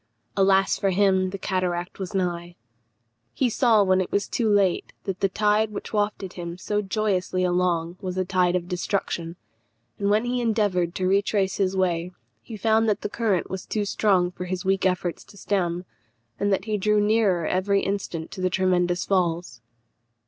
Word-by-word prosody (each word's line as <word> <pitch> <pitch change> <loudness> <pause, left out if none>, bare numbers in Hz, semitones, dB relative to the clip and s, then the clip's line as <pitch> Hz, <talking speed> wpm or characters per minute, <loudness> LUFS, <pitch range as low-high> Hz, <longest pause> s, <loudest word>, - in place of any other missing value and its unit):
Alas 195 0 +3
for 195 - +1
him! 190 -1 +2
the 195 - -5
cataract 180 -2 -2
was 190 0 -5
nigh. 175 -2 -2 0.8
He 250 -3 +1
saw, 220 -2 +4
when 185 -1 +3
it 185 - -4
was 200 - 0
too 230 -3 0
late, 200 -3 +2
that 195 -1 -4
the 195 - +2
tide 210 +2 +2
which 210 - -7
wafted 205 -3 -1
him 170 -1 -6
so 210 +3 -1
joyously 190 -3 -1
along 175 -1 0
was 185 -2 -4
a 185 - 0
tide 180 -1 +2
of 175 -1 -2
destruction; 175 -2 -2 0.6
and 200 - 0
when 215 +3 +2
he 245 0 -1
endeavoured 205 -7 +1
to 185 - -1
retrace 195 0 +1
his 190 -1 0
way, 175 -1 0 0.3
he 225 - -9
found 220 +2 +2
that 210 - 0
the - - -3
current 210 -5 0
was 190 -1 -6
too 210 -2 -1
strong 190 -3 +2
for 180 0 -6
his 180 0 -4
weak 190 0 +2
efforts 180 -2 -2
to 200 - -16
stem, 180 -3 -1 0.5
and 205 - +1
that 195 0 0
he 215 -2 -1
drew 210 +2 +2
nearer 205 -5 +2
every 195 +3 +1
instant 185 -5 -3
to 185 - -7
the 185 - +2
tremendous 180 -1 +1
falls. 170 -9 -1
190 Hz, 180 wpm, -24 LUFS, 180-205 Hz, 0.8 s, saw